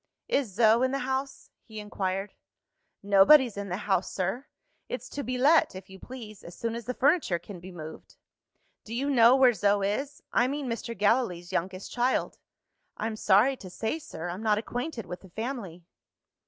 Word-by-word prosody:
"Is 255 -8 0
Zo 225 +1 +5
in 260 - +3
the 275 - -1
house?" 265 +1 -4
he 220 -2 -9
inquired. 195 -1 -3 0.7
"Nobody's 205 +5 +6
in 200 -1 -5
the 180 - -2
house, 190 -2 +1
sir. 190 +9 -3 0.4
It's - - -5
to 285 - -5
be 255 -2 -3
let, 300 - +4
if 190 0 -10
you 190 - -11
please, 220 -5 -10
as 170 - -10
soon 230 -1 -2
as 235 -1 -6
the 250 - -3
furniture 285 - +2
can 180 +2 -10
be 185 +2 -10
moved." 160 -3 -10 0.7
"Do 225 - -7
you 280 +4 0
know 240 -1 +6
where 260 -2 +5
Zo 200 0 +2
is? 270 +9 -2
I 245 - +3
mean, 285 +1 -3
Mr. 235 -1 -4
Gallilee's 200 -4 +1
youngest 185 +2 -3
child." 245 +1 0 0.6
"I'm 220 0 -3
sorry 215 +6 +4
to 190 - -10
say, 220 - -3
sir, 175 - -7
I'm 180 +4 -5
not 215 -2 +2
acquainted 245 - -4
with 180 +1 -7
the 190 - -15
family." 220 -5 -5
220 Hz, 180 wpm, -28 LUFS, 190-260 Hz, 0.7 s, Nobody's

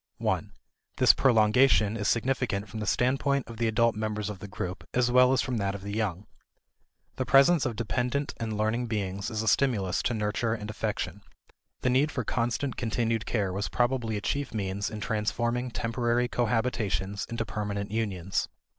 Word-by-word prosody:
1 - - -1 0.5
This - - +7
prolongation 110 -2 +4
is 105 -2 -2
significant 115 -4 0
from 110 +3 -7
the 105 - -4
standpoint 135 +3 +1
of 115 - -9
the 115 - +1
adult 115 +1 +2
members 105 -1 -2
of 100 - -9
the 100 - -8
group 95 -2 -5
as 125 -1 +3
well 125 +1 +6
as 130 - +2
from 125 -3 -2
that 100 -1 -1
of 100 - -8
the 100 0 -5
young. 105 -3 -2 0.9
The 130 - 0
presence 140 0 +5
of 120 - -4
dependent 125 +5 -1
and 110 -2 -3
learning 115 +3 0
beings 100 -2 -2
is 110 -2 -2
a - - -4
stimulus 105 -8 +2
to 120 - -1
nurture 110 +2 0
and 105 -1 -6
affection. 105 -2 -3 0.6
The 125 - +2
need 135 +4 +3
for 125 - -2
constant 120 +4 -1
continued 115 -1 -1
care 100 -5 0
was 100 +2 -2
probably 120 -3 0
a - - -4
chief 140 +4 -2
means 100 -1 -2
in 105 -1 -7
transforming 120 +3 -1
temporary 120 +1 0
cohabitations 110 -6 -1
into 115 -1 -2
permanent 100 0 -4
unions. 95 -5 -1
110 Hz, 175 wpm, -28 LUFS, 105-125 Hz, 0.9 s, This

